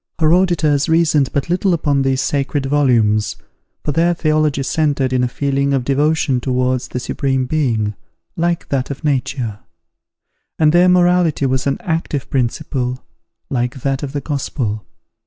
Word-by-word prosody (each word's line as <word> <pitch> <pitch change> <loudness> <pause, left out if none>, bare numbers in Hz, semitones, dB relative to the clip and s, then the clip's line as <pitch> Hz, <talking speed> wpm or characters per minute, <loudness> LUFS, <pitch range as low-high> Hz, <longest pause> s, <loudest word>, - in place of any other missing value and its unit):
Her 160 -1 +3
auditors 160 -6 +2
reasoned 160 -4 +3
but 140 +1 -1
little 180 +1 +1
upon 145 -4 +1
these 135 0 +1
sacred 140 +1 -1
volumes, 115 -7 +2 0.5
for 150 - -1
their 170 +4 +2
theology 155 -3 +1
centred 140 -3 0
in 125 -1 +2
a - - +2
feeling 140 +2 0
of 130 - -1
devotion 140 -2 +1
towards 130 0 0
the 125 - -4
Supreme 135 0 -1
Being, 120 -8 0 0.4
like 170 0 -1
that 135 -2 -1
of 140 +2 -6
nature: 130 -6 -1 1.0
and 155 -1 +4
their 180 +1 +5
morality 175 -4 +3
was 130 +1 0
an 140 - 0
active 160 -4 -3
principle, 125 0 -2 0.5
like 125 0 -2
that 135 -1 -1
of 140 -2 -5
the 145 - -2
Gospel. 130 -7 -3
140 Hz, 150 wpm, -18 LUFS, 130-155 Hz, 1.0 s, their